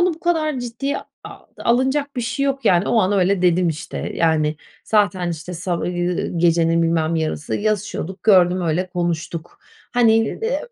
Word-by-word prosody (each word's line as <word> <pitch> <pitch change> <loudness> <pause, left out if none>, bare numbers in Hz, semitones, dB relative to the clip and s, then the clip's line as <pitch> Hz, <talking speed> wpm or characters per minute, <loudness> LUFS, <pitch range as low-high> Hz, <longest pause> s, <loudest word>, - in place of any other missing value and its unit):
bunu 350 -2 +2
bu 330 - -19
kadar 310 -5 0
ciddiye 245 +4 -3 0.3
a - - -10 0.2
alınacak 265 +4 0
bir - - 0
şeyi 275 +4 -2
yok. 275 0 -2
Yani, 180 +1 +3
o 230 - +3
an 190 0 +1
öyle 190 -1 +2
dedim, 180 0 +3
işte. 160 +1 -5
Yani, 155 -2 +1 0.3
zaten, 200 -5 +1
işte, 170 +2 -6
sa 180 +2 -3
ııı, 175 0 -2
gecenin 165 0 +3
bilmem 165 0 +1
yarısı 155 -2 -2
yazışıyorduk, 205 -3 -3
gördüm, 185 -3 +4
öyle 175 +3 0
konuştuk. 170 -2 -4 0.4
Hani, 235 -2 +5
eee, 450 - -1
185 Hz, 160 wpm, -20 LUFS, 170-235 Hz, 0.4 s, Hani